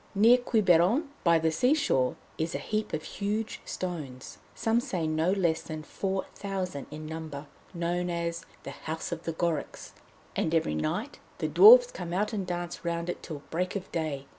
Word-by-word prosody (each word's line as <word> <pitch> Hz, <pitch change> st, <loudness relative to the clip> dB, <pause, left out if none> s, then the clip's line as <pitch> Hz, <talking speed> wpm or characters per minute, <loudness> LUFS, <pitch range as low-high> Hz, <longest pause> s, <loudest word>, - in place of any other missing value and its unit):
Near 230 Hz, +5 st, +6 dB
Quiberon, 215 Hz, -, +3 dB
by 170 Hz, -2 st, +5 dB
the 160 Hz, 0 st, +1 dB
sea 250 Hz, -, +3 dB
shore, 130 Hz, -, +1 dB, 0.2 s
is 160 Hz, +1 st, -1 dB
a -, -, +1 dB
heap 215 Hz, 0 st, -2 dB
of 155 Hz, 0 st, -3 dB
huge 210 Hz, +2 st, -3 dB
stones, 150 Hz, -8 st, -6 dB, 0.2 s
some 225 Hz, +1 st, +2 dB
say 185 Hz, -, -2 dB
no 155 Hz, +3 st, +1 dB
less 170 Hz, -5 st, +1 dB
than 155 Hz, -1 st, -6 dB
four 190 Hz, +3 st, -2 dB
thousand 185 Hz, -8 st, -4 dB
in 155 Hz, +1 st, -8 dB
number, 155 Hz, -2 st, -6 dB, 0.3 s
known 175 Hz, +1 st, -1 dB
as 170 Hz, -1 st, -2 dB, 0.2 s
'The -, -, -6 dB, 0.2 s
House 160 Hz, +2 st, -3 dB
of 170 Hz, 0 st, -5 dB
the 165 Hz, -, -2 dB
Gorics,' 160 Hz, -3 st, -2 dB, 0.4 s
and 160 Hz, -, 0 dB
every 160 Hz, -, +1 dB
night 175 Hz, -, -2 dB, 0.2 s
the -, -, -1 dB
Dwarfs -, -, +9 dB
come 170 Hz, -, -6 dB
out 210 Hz, +5 st, 0 dB
and 195 Hz, -4 st, -2 dB
dance 175 Hz, -1 st, -4 dB
round 170 Hz, 0 st, -1 dB
it -, -, -9 dB
till 150 Hz, -3 st, -7 dB
break 180 Hz, +4 st, -1 dB
of 195 Hz, -1 st, -5 dB
day. 155 Hz, -4 st, -2 dB
175 Hz, 180 wpm, -29 LUFS, 160-200 Hz, 0.4 s, Dwarfs